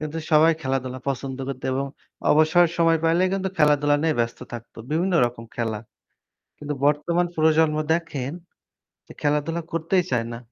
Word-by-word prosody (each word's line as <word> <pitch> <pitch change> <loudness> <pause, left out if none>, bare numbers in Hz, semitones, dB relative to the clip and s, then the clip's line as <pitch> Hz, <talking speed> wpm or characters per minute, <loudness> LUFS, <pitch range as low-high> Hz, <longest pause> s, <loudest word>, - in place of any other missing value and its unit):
কিন্তু 155 +1 -5
সবাই 155 +2 +6
খেলাধুলা 130 -2 -2
পছন্দ 135 0 -3
করত, 135 -1 -5
এবং 135 +1 -1 0.5
অবসরের 160 +3 +4
সময় 165 -1 +3
পাইলে 165 +2 +3
কিন্তু 190 -1 -1
খেলাধুলা 145 -1 +4
নিয়ে 160 -3 +1
ব্যস্ত 115 0 -1
থাকতো। 115 0 -9
বিভিন্ন 175 +4 +1
রকম 120 -1 -6
খেলা। 115 -3 -2 0.8
কিন্তু 150 0 -4
বর্তমান 170 +4 +1
প্রজন্ম 155 0 +3 0.2
দেখেন, 150 -5 -2 0.7
যে - - -12
খেলাধুলা 150 +3 0
করতেই 165 +3 +1
চায় 115 -2 0
না। 115 - -6
150 Hz, 150 wpm, -23 LUFS, 135-165 Hz, 0.8 s, সবাই